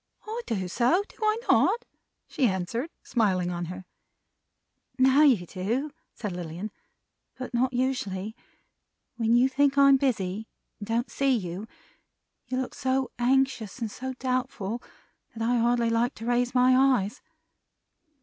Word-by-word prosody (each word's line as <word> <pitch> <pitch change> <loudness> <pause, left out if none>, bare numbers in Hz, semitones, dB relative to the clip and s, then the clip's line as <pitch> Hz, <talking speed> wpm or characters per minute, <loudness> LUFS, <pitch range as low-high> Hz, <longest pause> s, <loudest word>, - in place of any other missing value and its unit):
"I 445 +3 -4
do 190 -5 -2
so. 250 - +2
Do - - -20
I 430 0 +2
not?" 475 - +3 0.4
she 260 - +1
answered: 205 - -2
smiling 190 -7 +1
on 175 0 -3
her. 180 +2 -8 1.1
"Now 265 +2 +5
you 250 -12 +5
do," 225 - -2 0.2
said 210 -4 -4
Lilian, 175 +3 -6 0.7
"but 255 -1 -6
not 250 +2 +2
usually. 220 -5 -2 0.8
When 230 0 +2
you 245 +2 +5
think 280 +1 +2
I'm 275 -1 +7
busy, 220 -6 -1 0.3
and 205 - -7
don't 230 +2 -1
see 275 -1 +2
you, 185 +1 -5 0.8
you 255 +1 -2
look 260 - -3
so 260 0 -1
anxious 260 -3 +1
and 230 -4 -4
so 260 +3 -5
doubtful, 250 -4 -2 0.5
that 225 0 -2
I 245 0 +2
hardly 235 0 +2
like 235 +3 +1
to 225 - -8
raise 245 +1 +1
my 255 +1 +5
eyes. 260 -4 +2
240 Hz, 140 wpm, -27 LUFS, 205-260 Hz, 1.1 s, I'm